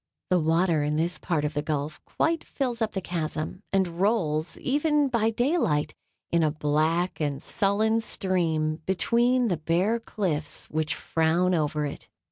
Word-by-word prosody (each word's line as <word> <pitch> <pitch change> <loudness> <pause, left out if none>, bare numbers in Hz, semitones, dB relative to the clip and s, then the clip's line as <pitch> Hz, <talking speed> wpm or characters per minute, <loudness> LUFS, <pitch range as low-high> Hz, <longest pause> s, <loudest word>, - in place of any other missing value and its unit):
The 180 - +5
water 165 0 +2
in 150 +1 0
this 170 +3 0
part 155 -4 -1
of 150 - -2
the 145 - -1
gulf 150 0 -3
quite 325 0 0
fills 245 -4 -3
up 220 - 0
the 190 - -2
chasm, 160 0 -3
and 185 -3 0
rolls, 175 -7 +1
even 295 +1 +1
by 230 -3 +2
day 255 +10 +1
light, 150 - 0 0.4
in 170 - +3
a 155 - +3
black 155 +4 0
and 145 -2 -1
sullen 215 +7 +1
stream 165 -7 0
between 240 +6 +2
the 180 -5 0
bare 175 +9 +1
cliffs 175 -9 -3
which 155 -1 -1
frown 165 +3 +1
over 150 -2 0
it. 140 - -7
170 Hz, 160 wpm, -26 LUFS, 155-220 Hz, 0.4 s, The